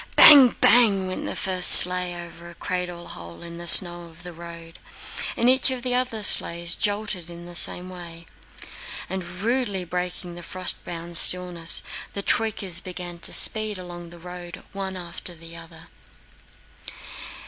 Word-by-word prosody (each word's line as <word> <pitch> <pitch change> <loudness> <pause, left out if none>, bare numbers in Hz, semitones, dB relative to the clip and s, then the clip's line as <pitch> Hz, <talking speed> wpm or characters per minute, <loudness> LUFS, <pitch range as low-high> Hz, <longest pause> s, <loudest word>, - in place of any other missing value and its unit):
Bang, 275 -5 +5
bang! 205 -4 +1
went 185 0 -8
the - - -8
first 185 -1 0
sleigh 180 0 +6
over 170 0 -14
a 170 - -17
cradle 180 -1 -8
hole 85 - -13
in 170 0 -11
the 175 - -8
snow 175 0 +5
of 165 0 -19
the 175 -1 -12
road, 170 0 -14 0.6
and 235 - -2
each 260 +2 +1
of 255 -2 -8
the 250 -1 -5
other 250 -4 -5
sleighs 170 -3 +4
jolted 205 -5 -5
in 170 0 -14
the 175 - -13
same 175 +1 +1
way, 170 -2 -13 0.8
and 190 0 -7 0.2
rudely 230 -5 -4
breaking 180 0 -8
the 175 - -13
frost 185 +1 -4
bound 170 0 -4
stillness, 175 -2 +3 0.3
the 200 - -7
troykas 200 -7 -3
began 180 -1 -10
to - - -1
speed 215 -2 +4
along 175 -1 -13
the 175 - -16
road, 175 0 -13
one 190 -1 -8
after 175 0 -10
the 165 +1 -15
other. 165 -1 -14
180 Hz, 160 wpm, -20 LUFS, 170-195 Hz, 0.8 s, sleigh